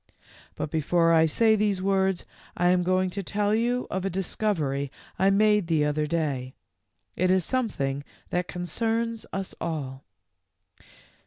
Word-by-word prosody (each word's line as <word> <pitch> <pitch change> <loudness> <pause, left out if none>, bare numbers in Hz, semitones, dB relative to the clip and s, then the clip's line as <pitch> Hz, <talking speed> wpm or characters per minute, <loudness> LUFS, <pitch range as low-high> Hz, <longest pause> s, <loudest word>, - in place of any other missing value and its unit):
But 150 - -4
before 165 +2 +2
I 160 0 +5
say 220 +7 +4
these 205 -2 +1
words 190 -1 +1 0.3
I 175 0 +3
am 180 0 +4
going 185 +1 +1
to 200 - -3
tell 205 +2 0
you 240 +3 +1
of 190 0 -2
a 195 - 0
discovery 165 -7 -1 0.3
I 190 +1 +4
made 210 -1 +3
the 155 -3 +2
other 150 +1 0
day. 140 -6 -2 0.6
It 185 +1 +1
is 185 -2 +3
something 145 - -1 0.3
that 180 0 0
concerns 225 +5 -2
us 195 -1 -4
all." 135 -5 -4
185 Hz, 145 wpm, -26 LUFS, 160-205 Hz, 0.6 s, I